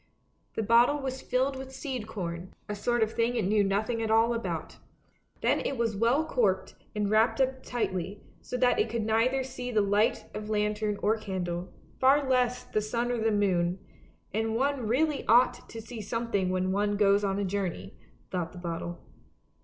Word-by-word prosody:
The 220 - 0
bottle 235 +6 +5
was 265 -1 -4
filled 265 +2 0
with 265 0 -7
seed 255 -8 -4
corn, 180 -4 -5
a 210 - -3
sort 235 +3 +1
of 220 0 -2
thing 235 +1 +1
it 230 - +1
knew 210 +1 +3
nothing 215 +4 0
at 220 - -1
all 225 +2 +4
about. 230 0 -4 0.6
Then - - +2
it 275 - -2
was 230 -2 0
well 240 +9 +2
corked 215 -11 +1 0.2
and 210 -1 0
wrapped 220 +5 +3
up 260 0 +1
tightly, 200 -5 -3 0.2
so 250 - -4
that 250 - +3
it 430 - +2
could 235 -2 -1
neither 240 +5 +2
see 250 -1 -6
the 220 -3 +2
light 205 +2 +2
of 210 0 -6
lantern 210 0 0
or 215 +2 +3
candle, 180 -4 -4 0.3
far 275 +2 +4
less 250 -1 +2
the 215 - -1
sun 235 +3 -1
or 240 - -1
the 225 0 +2
moon 185 -4 +1 0.3
— - - -33
and 220 +1 0
one 270 -1 0
really 290 +5 +1
ought 240 +3 +4
to 225 - -7
see 225 0 -7
some 230 +3 -3
thing 190 -2 +1
when 185 0 0
one 205 +1 +1
goes 200 0 +4
on 195 -1 0
a 200 - 0
journey, 185 - -3 0.4
thought 175 -3 -3
the - - -11
bottle. 170 0 -5
220 Hz, 195 wpm, -29 LUFS, 200-245 Hz, 0.6 s, bottle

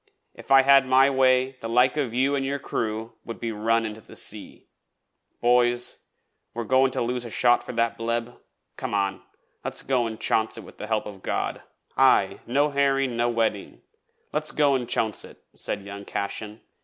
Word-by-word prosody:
If - - -14
I 135 0 +7
had 135 -1 +6
my 135 +2 +5
way, 130 0 +2
the 115 - -5
like 125 +3 +3
of 140 -6 -1
you 135 +4 +1
an' 135 - -1
your 140 +1 -1
crew 115 -4 -3
would 115 - -8
be 115 - -3
run 115 +2 +1
into 110 0 -6
the - - -15
sea. - - -4 0.8
Boys, 120 0 +2 0.6
are 120 - -2
we - - -12
goin' 130 +1 +4
to - - 0
lose 125 +1 -2
a 120 - -7
shot 120 +2 +3
for - - -7
that 115 -1 0
bleb? 115 +1 -2 0.4
Come - - -3
on, 100 -1 -1 0.4
let's - - -2
go 125 -3 +1
an' 110 -1 -6
chonce 110 0 +1
it - - -8
with - - -15
the 105 - -5
help 110 -1 0
of 100 -2 -9
God.' - - -2 0.4
'Aye, - - +4
no 145 +5 +2
herring, 135 -2 +1
no 120 +1 +1
wedding. 115 -4 -2 0.5
Let's 155 0 0
go 145 -2 +3
an' 125 -3 -1
chonce 110 -3 0
it,' - - -15
said 100 - -4
young 100 0 -8
Cashen. 105 +2 -5
120 Hz, 190 wpm, -25 LUFS, 110-130 Hz, 0.8 s, I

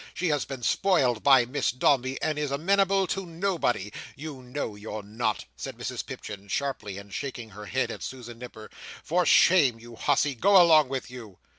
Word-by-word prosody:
She 180 0 -1
has 145 -2 0
been 135 -3 -7
spoiled 130 - +2
by 135 -3 +6
Miss 135 +3 -1
Dombey, 130 +1 +1
and 155 -1 0
is 150 -1 -1
amenable 195 +6 +2
to 195 +1 -3
nobody. 165 - -1 0.2
You 145 -2 -8
know 125 -2 -5
you're 105 0 -7
not," 110 +1 -2
said - - -7
Mrs - - -4
Pipchin, 100 -1 -8
sharply, 105 -4 -3
and 100 0 -11
shaking 120 -2 -5
her 105 +1 -10
head 90 - -1
at - - -8
Susan 120 -3 -8
Nipper. 120 -3 -10 0.3
"For 175 +1 +1
shame, 140 -11 +5
you 120 0 -12
hussy! 145 +5 +1
Go 190 - +5
along 155 -5 +6
with 130 -2 -4
you!" 110 -7 -10
130 Hz, 180 wpm, -27 LUFS, 115-155 Hz, 0.3 s, by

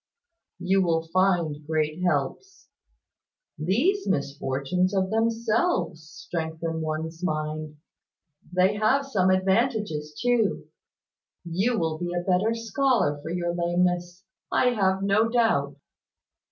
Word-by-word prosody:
"You 190 +2 +2
will 165 -3 +1
find 170 -3 +1
great 155 +1 -1
helps. 175 - -2 0.9
These 260 - +1
misfortunes, 140 +4 -1
of 190 0 0
themselves, 225 - 0 0.2
strengthen 160 -1 -3
one's 160 +2 -4
mind. 155 -2 -3 0.7
They 185 +3 +2
have 255 +7 +2
some 190 -9 +1
advantages 190 - 0
too. 240 -4 +1 0.8
You 195 +8 0
will 160 -4 -1
be 175 0 -3
a 175 - -1
better 195 +5 +1
scholar 230 - +1
for 155 - -7
your 175 0 -1
lameness, 175 +1 0 0.3
I 250 - +3
have 195 -4 +1
no 205 +3 +3
doubt. 185 - +1
180 Hz, 110 wpm, -26 LUFS, 160-215 Hz, 0.9 s, I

